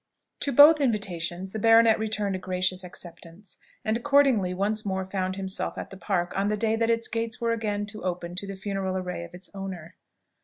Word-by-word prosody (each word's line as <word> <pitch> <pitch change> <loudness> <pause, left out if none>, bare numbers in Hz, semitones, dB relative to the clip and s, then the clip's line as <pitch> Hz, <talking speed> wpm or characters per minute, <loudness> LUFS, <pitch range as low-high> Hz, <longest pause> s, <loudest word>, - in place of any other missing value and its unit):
To 280 - -1
both 295 +3 +8
invitations 190 -6 -1
the 220 - -4
baronet 225 0 +6
returned 210 -3 -1
a - - -4
gracious 185 0 -1
acceptance, 175 +1 -10 0.3
and 220 - +1
accordingly 260 -7 +3
once 205 +4 -1
more 190 -1 -2
found 185 -1 -2
himself 190 -1 -3
at - - -6
the - - -8
Park 180 -3 -1
on 195 +1 +1
the 210 0 0
day 220 +1 +1
that 230 0 0
its 230 0 +1
gates 230 0 -3
were 235 -1 0
again 210 -3 -1
to 215 +1 -8
open 175 -1 -3
to 200 - -3
the 195 - -5
funeral 190 -1 -3
array 180 -2 -4
of 170 - -13
its 180 +1 -7
owner. 185 -3 -7
195 Hz, 200 wpm, -26 LUFS, 185-225 Hz, 0.3 s, both